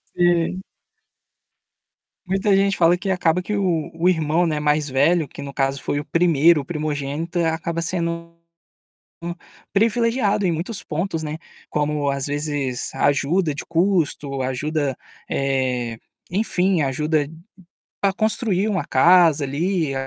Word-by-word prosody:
Sim. 175 +1 +2 1.6
Muita 195 +2 +2
gente 195 0 +2
fala 170 +1 +4
que 195 +2 -4
acaba 180 -1 +1
que 210 +3 -3
o 175 -5 0
o 170 +2 +2
irmão, 165 0 +2
não 155 - 0
é, - - -2
mais 150 0 +1
velho 150 +5 +2
que 140 - -10
no 140 0 -7
caso 135 0 -1
foi 145 - -1
o 145 - -4
1°, 165 -2 +4
o - - -6
primogênito, 155 +2 -3
acaba 165 +1 -1
sendo 170 -1 -3 0.8
hum, 170 0 -3 0.4
privilegiado 225 -1 +2
em 180 - +2
muitos 185 +6 -3
pontos, 165 +1 -3
né, 155 0 -4 0.3
como 150 -1 0
às 140 -1 -2
vezes 145 -3 -2
ajuda 145 +4 +1
de 145 - -6
custo, 165 -6 0
ajuda, 140 +2 -1 0.3
eh, 130 -4 -1 0.3
enfim, 185 -3 +1
ajuda 150 +2 0 0.7
para 195 - +3
construir 215 -2 0
uma 190 -7 0
casa, 165 0 +5
ali, 160 +1 -1
165 Hz, 135 wpm, -22 LUFS, 145-180 Hz, 1.6 s, casa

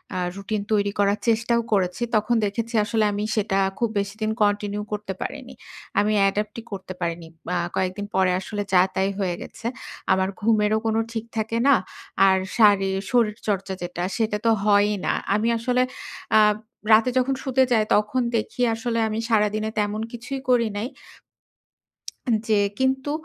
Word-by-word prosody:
আ - - -1 0.2
routine 200 +1 -3
তৈরি 200 -1 +2
করার 200 +1 +2
চেষ্টাও 230 +1 +2
করেছি। 185 +3 0
তখন 215 +3 +2
দেখেছি 230 +4 -3
আসলে 220 0 +1
আমি 205 +1 -2
সেটা 195 -2 +1 0.2
খুব 235 -2 +1
বেশিদিন 215 +2 -2
কন্টিনিউ 205 0 0
করতে 205 -2 -4
পারিনি। 265 -1 -6 0.5
আমি 210 +1 +2
অ্যাডাপ্টই 210 +3 0
করতে 190 -1 -6
পারিনি। 170 -1 -3 0.3
আ - - +1 0.2
কয়েকদিন 190 +2 -1
পরে 190 -1 +3
আসলে 205 +1 -4
যা, 180 - +7
তাই 190 +1 +1
হয়ে 180 -3 0
গেছে। 225 - -11 0.5
আমার 190 0 +1
ঘুমেরও 215 0 +2
কোন 220 - +1 0.2
ঠিক 225 0 -3
থাকে 220 +1 -1
না। 280 - +7 0.5
আর 190 0 +4 0.2
শারি 200 -3 +5 0.2
শরীরচর্চা 210 -4 0
যেটা, 175 0 -4
সেটা 215 -2 0
তো 230 - +5
হয়ই 205 0 +4
না। - - +2 0.2
আমি 215 +2 +1
আসলে 250 +2 +1 0.6
আ - - +8 0.5
রাতে 225 +3 +5
যখন 265 +1 +1
শুতে 265 -1 +3
যাই, 220 -2 +4
তখন 210 +5 +1 0.2
দেখি 240 +3 -4
আসলে 230 0 -2
আমি 215 - -2
সারাদিনে 215 0 +1
তেমন 210 +1 -1
কিছুই 250 +3 -5
করি 235 -2 +4
নাই। 220 +4 -2 1.4
উন 230 - +3
যে 210 -1 +4 0.2
কিন্তু 265 +2 +1
215 Hz, 155 wpm, -24 LUFS, 200-230 Hz, 1.4 s, আ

